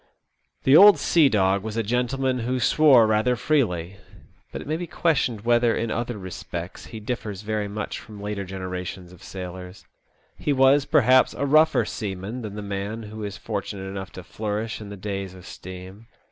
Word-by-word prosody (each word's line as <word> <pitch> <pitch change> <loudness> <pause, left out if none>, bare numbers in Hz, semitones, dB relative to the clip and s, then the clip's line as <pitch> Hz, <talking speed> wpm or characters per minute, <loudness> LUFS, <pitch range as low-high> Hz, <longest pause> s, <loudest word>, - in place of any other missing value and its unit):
The 135 - +5
old 205 +4 +9
sea 160 -5 +4
dog 95 -3 +2
was 110 +2 -5
a 115 - +1
gentleman 125 +3 0
who 125 +2 -1
swore 135 -3 +5
rather 110 +3 +2
freely; 100 - 0 0.5
but - - -5
it - - -8
may 155 - -1
be 175 +1 -4
questioned 135 -12 0
whether 120 0 +3
in 115 0 -2
other 120 -1 -3
respects 90 -1 -7
he 110 - -8
differs 105 -3 -5
very 105 -1 -2
much 105 +1 -5
from 105 -2 -12
later 105 -1 -4
generations 90 -1 -6
of 90 0 -16
sailors. 90 0 -8 0.5
He 145 - 0
was, 135 +1 +4
perhaps, 130 -1 +4
a 140 - -1
rougher 155 +3 +4
seaman 100 +3 -5
than 105 -3 -7
the 105 - -6
man 100 +3 -4
who 110 0 -8
is 100 -1 -5
fortunate 100 -2 -5
enough 95 +1 -6
to 95 - -9
flourish 110 +3 -4
in 105 - -8
the 100 - -8
days 95 -1 -5
of 90 - -13
steam. 95 +4 -10
105 Hz, 180 wpm, -24 LUFS, 95-125 Hz, 0.5 s, old